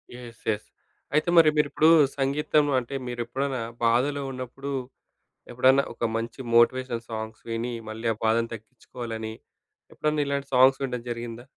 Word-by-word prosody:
Yes. 120 -2 -11
Yes. 105 0 -4 0.5
అయితే 155 +3 +2
మరి 165 -2 +8
మీరిప్పుడు 150 +2 +3 0.3
సంగీతం 145 +2 +2
అంటే 125 +2 -7
మీరెప్పుడైనా 125 +2 -3 0.2
బాధలో 130 +5 +2
ఉన్నప్పుడు, 130 +2 -6 0.8
ఎప్పుడన్నా 130 +3 +4
ఒక - - -4
మంచి 115 +3 -4 0.2
మోటివేషనల్ 120 0 +3
సాంగ్స్ 110 0 -6
విని 115 +2 -2 0.2
మళ్ళీ 110 +2 -6
ఆ - - -16
బాధను 115 +1 +2
తగ్గిచ్చుకోవాలని, 110 +1 -7 0.6
ఎప్పుడన్నా 150 -1 0
ఇలాంటి 140 0 -2
సాంగ్స్ 130 +2 +6
వినడం 125 -3 -3
జరిగిందా? 120 0 -6
125 Hz, 130 wpm, -26 LUFS, 115-140 Hz, 0.8 s, మరి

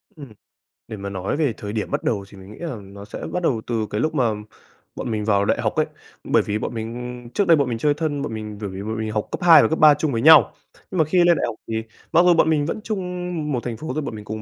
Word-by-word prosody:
Ừm, 140 -7 -11 0.6
để 110 - -7
mà 100 0 -5
nói 95 +7 -3
về 145 -8 +1
thời 105 0 -6
điểm 110 - -3
bắt - - -1
đầu 100 -4 -1
thì 100 - -14
mình 95 +2 -12
nghĩ - - -12
là 165 -6 -4
nó 100 +1 -11
sẽ - - -8
bắt 180 - -2
đầu 120 -9 +1
từ 115 -3 -1
cái 105 - -2
lúc 155 0 -1
mà 120 -6 +2 0.6
bọn - - -4
mình 105 -1 -2
vào 100 -2 +2
đại - - +1
học - - -1
ấy. - - +2 0.4
Bởi - - +3
vì 105 +1 -1
bọn - - -4
mình, 115 0 -5 0.3
ừm, 120 - -12
trước 200 +8 0
đây 165 -2 +6
bọn 140 -3 +1
mình 115 - -2
chơi 145 +5 +2
thân 145 -1 -2
bọn 115 - -4
mình 105 -1 -6
bởi 100 - -3
vì 95 +1 -7
bọn 110 +1 -4
mình 110 -1 -3
học 105 -1 -2
cấp - - -4
2 170 -2 +9
và - - +3
cấp 160 - -1
3 155 -1 +8
chung 150 +1 -1
với 115 -2 -1
nhau. 150 -6 +7 0.4
Nhưng 185 - -3
mà 160 - +4
khi 170 +5 0
lên 175 -1 +5
đại - - 0
học 115 - -4
thì 115 - -4 0.4
mặc 165 - +5
dù 180 - +6
bọn 165 -1 +3
mình 150 -2 +2
vẫn 190 +7 -3
chung 215 -4 -3 0.5
một 125 -3 -2
thành 120 -2 -4
phố 160 - -7
thôi 155 - -2
bọn 130 - -5
mình 105 -1 -9
cùng 110 +1 -5
120 Hz, 305 wpm, -22 LUFS, 105-155 Hz, 0.6 s, 2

